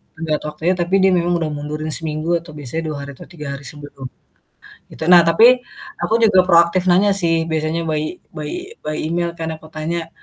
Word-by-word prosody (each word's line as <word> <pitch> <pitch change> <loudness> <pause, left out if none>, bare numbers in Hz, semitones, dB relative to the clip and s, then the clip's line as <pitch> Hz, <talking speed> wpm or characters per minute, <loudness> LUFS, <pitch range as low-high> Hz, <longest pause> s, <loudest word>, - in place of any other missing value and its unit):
tenggat 160 -1 -2
waktunya, 165 +4 -1
tapi 175 +2 0
dia 190 - +6
memang 175 0 +1
udah 160 - -1
mundurin 150 +1 -5
seminggu 160 +2 -1
atau 170 -2 -13
biasanya 150 +4 -4
2 150 - -4
hari 140 - -8
atau - - -11
3 150 -5 -8
hari 140 - -13
sebelum 145 -1 -9 0.9
gitu, 160 - -7
nah 175 -1 +9
tapi 165 +8 +6 0.5
aku 220 - 0
juga 190 -4 +6
proaktif 170 +2 +4
nanya 200 +3 +4
sih 165 -4 +1
biasanya 160 +1 -1
by 155 +2 -2 0.2
by 150 -2 -6 0.3
by 155 0 -3
email 170 +2 -1
kan, 160 0 -3
aku 155 - -13
tanya, 165 +1 -3
165 Hz, 190 wpm, -19 LUFS, 155-175 Hz, 0.9 s, nah